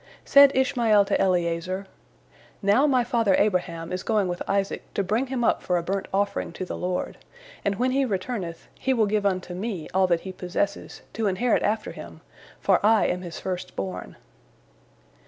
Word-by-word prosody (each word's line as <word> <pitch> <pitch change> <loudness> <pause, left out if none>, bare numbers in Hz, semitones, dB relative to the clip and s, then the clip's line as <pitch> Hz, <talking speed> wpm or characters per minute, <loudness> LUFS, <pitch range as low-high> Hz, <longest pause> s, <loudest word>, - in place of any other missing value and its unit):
Said 280 0 +7
Ishmael 235 -6 +3
to - - +1
Eliezer: 180 +1 0 0.8
"Now 210 +9 +4
my 255 -3 +3
father 230 -5 +2
Abraham 170 -5 0
is 180 0 -2
going 210 -3 +1
with 175 -1 -4
Isaac 195 0 0
to 200 - +1
bring 220 +8 0
him 255 -2 -2
up - - +2
for 180 - 0
a 170 - -2
burnt 195 +2 -2
offering 200 -2 -1
to 185 - -5
the - - -5
Lord, 180 0 -3 0.4
and 200 0 0
when 250 +4 +1
he 275 +1 +2
returneth, 195 -6 -4
he 265 0 +1
will 225 -3 +3
give 205 0 +1
unto 185 -2 -2
me 185 -3 -4
all 190 0 +3
that 170 -2 +1
he 190 - -6
possesses, 180 +2 -3
to 220 -1 -1
inherit 210 +5 +1
after 215 +1 -1
him, - - -11 0.4
for - - +2
I 220 +1 +5
am 180 0 -1
his 175 -2 -7
first 185 -1 -5
born." 95 -2 -5
195 Hz, 180 wpm, -25 LUFS, 180-225 Hz, 0.8 s, Said